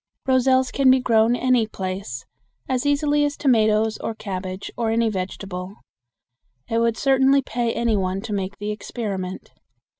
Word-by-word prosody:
Roselles 260 0 +3
can 275 -2 +3
be 260 0 +6
grown 230 -1 +3
any 250 -3 +2
place 185 - -5 0.4
as 260 +2 -1
easily 290 +1 +2
as 290 0 -1
tomatoes 220 -4 +2
or 225 - -4
cabbage 185 -2 -5
or 230 -2 -1
any 230 0 +2
vegetable. 190 -1 -5 0.9
It 230 - 0
would 230 -1 +1
certainly 270 0 +3
pay 235 -1 -1
any 235 -2 0
one 190 -1 -1
to 215 0 -5
make 195 0 -3
the 205 +1 -3
experiment. 200 -4 -5
225 Hz, 150 wpm, -22 LUFS, 195-255 Hz, 0.9 s, be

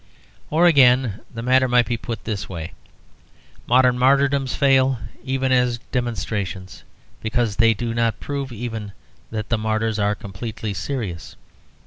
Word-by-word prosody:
Or, 165 +3 +3
again, 130 - +4
the 115 -1 -6
matter 130 +1 +4
might 125 -1 +4
be 120 - -1
put 115 0 -5
in - - -25
this 105 -2 -4
way. 85 -2 -6 0.9
Modern 125 0 +4
martyrdoms 135 0 +3
fail 135 -2 +3 0.3
even 130 0 -1
as 125 -2 +2
demonstrations, 105 -6 -3 0.4
because 110 -2 -1
they 115 -1 +4
do 115 +2 -3
not 115 -1 0
prove 140 -2 -4
even 110 -3 -5 0.4
that 110 -1 -5
the 115 - +1
martyrs 110 0 -1
are 105 0 +1
completely 105 +2 -6
serious. 95 - -5
120 Hz, 140 wpm, -22 LUFS, 110-130 Hz, 0.9 s, again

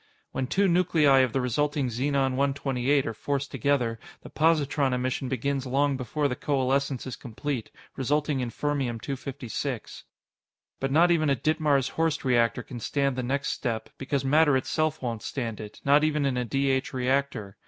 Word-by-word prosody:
When 130 -1 -2
two 195 +8 +2
nuclei 165 -6 +4
of 130 -2 +3
the 130 - 0
resulting 140 +2 0
Xenon 135 +3 0
128 135 0 +1
are 115 - -3
forced 140 +4 -3
together, 125 -6 0 0.2
the - - -11
positron 150 -4 +2
emission 130 +1 -1
begins 135 +1 -1
long 140 +2 +2
before 140 +3 -1
the 125 - -2
coalescence 135 -1 0
is 130 - -5
complete, 125 0 -5 0.3
resulting 145 +1 0
in 125 -2 -2
Fermium 135 -3 -2
256. 135 -2 -5 0.7
But 135 0 -1
not 170 +4 +5
even 155 -3 +2
a 140 - +3
Ditmars 145 -1 +1
Horst 160 -2 0
reactor 120 -1 +2
can 120 0 -8
stand 140 +2 0
the 130 - -2
next 135 +2 -1
step, 115 -4 -3
because 135 0 -1
matter 145 0 +4
itself 155 +3 -1
won't 115 -3 -3
stand 115 -4 -4
it 105 -1 -9
not 145 +2 +5
even 150 -2 +1
in 135 -2 +1
a 125 0 -1
D 135 +4 +1
H 130 0 -1
reactor. 125 -5 -1
135 Hz, 170 wpm, -27 LUFS, 125-145 Hz, 0.7 s, not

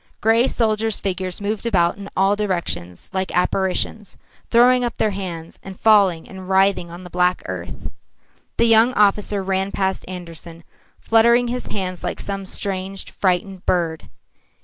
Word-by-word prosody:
Grey 225 +3 +3
soldiers' 220 -3 0
figures 185 -2 -3
moved 205 +1 -3
about 175 -7 +2
in 200 0 -9
all 195 +2 +3
directions 175 - -3
like 190 0 -2
apparitions, 190 +3 0 0.3
throwing 245 +1 +5
up 240 - -3
their 215 - +1
hands 175 -4 -6
and 190 -1 -10
falling 200 -7 +4
and 190 -1 -10
writhing 190 -2 +2
on 175 +2 -10
the 180 - -10
black 180 0 +1
earth. - - -6 0.7
The 235 - +4
young 230 +2 +5
officer 205 -1 +2
ran 190 +1 -1
past 190 -1 -1
Andersen, 170 -2 -9 0.4
fluttering 235 +2 +4
his 250 +1 -4
hands 185 -3 -4
like - - -3
some 195 -1 -5
strange, 195 0 -4
frightened 185 0 -1
bird. 165 -3 -1
195 Hz, 150 wpm, -21 LUFS, 180-215 Hz, 0.7 s, throwing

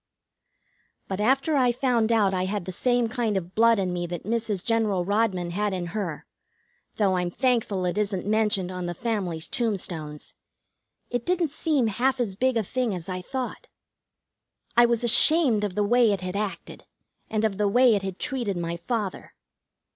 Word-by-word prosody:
But 190 +1 -3
after 270 +7 +2
I 255 -3 +3
found 240 -2 +1
out 205 -4 +3
I 185 0 0
had 200 -1 -3
the 190 - -5
same 245 +5 +1
kind 225 -3 -1
of 180 0 -5
blood 230 0 +4
in 185 -2 -1
me 175 -1 -3
that 175 -1 -6
Mrs. 220 -3 -2
General 215 -6 0
Rodman 195 -4 0
had 205 +2 -1
in 180 -2 -3
her, 185 -8 -4 0.7
though 195 -3 +1
I'm 180 -1 -1
thankful 225 -4 0
it 180 +3 -1
isn't 200 -3 -1
mentioned 210 -3 +1
on 180 -1 -4
the 175 - -4
family's 190 -8 -3
tombstones, 175 -10 -3 0.8
it 245 -1 -2
didn't 350 -2 0
seem 300 -4 0
half 255 +5 0
as 225 -6 -1
big 255 +4 0
a 225 - +1
thing 240 0 -2
as 175 0 -7
I 185 0 -4
thought. 260 - -5 1.1
I 240 0 +6
was 235 0 +1
ashamed 245 -2 +6
of 200 -3 -3
the 210 - +1
way 235 +1 +4
it 195 -2 -2
had 185 +1 -5
acted, 200 -4 -5 0.4
and 220 0 0
of 210 -2 -2
the 210 - +2
way 245 +3 +5
it 205 - +1
had 190 -1 -5
treated 245 -9 -2
my 170 0 -3
father. 205 +1 -4
210 Hz, 180 wpm, -25 LUFS, 185-240 Hz, 1.1 s, I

